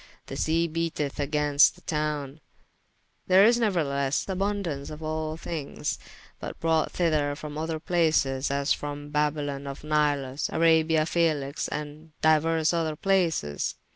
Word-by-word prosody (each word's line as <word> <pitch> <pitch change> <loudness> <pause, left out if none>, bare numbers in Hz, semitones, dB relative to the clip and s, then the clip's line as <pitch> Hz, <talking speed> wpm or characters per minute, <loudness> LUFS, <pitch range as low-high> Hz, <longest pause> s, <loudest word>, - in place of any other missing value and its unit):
The - - -7
sea 165 +2 +1
beateth 160 -3 -3
agaynst 145 0 +3
the - - -19
towne. 150 -2 -3 0.9
There 190 +2 +7
is 235 +2 +4
neuerthelesse 145 - 0
aboundance 190 -7 -2
of 155 +1 -8
all 155 0 -3
thinges: 160 -4 -4 0.4
but - - -7
brought 160 -2 +1
thyther 155 -4 +1
from 150 0 -7
other 160 +1 -3
places, 155 -6 +1
as 140 +1 +1
from 145 0 -6
Babylon 145 -2 -1
of 140 +1 -7
Nilus, 145 -3 0
Arabia 160 -1 +3
F[æ]lix, 155 -4 0
and 150 +1 -6
dyuers 160 +1 +3
other 160 -2 0
places. 165 - 0
155 Hz, 130 wpm, -27 LUFS, 145-165 Hz, 0.9 s, There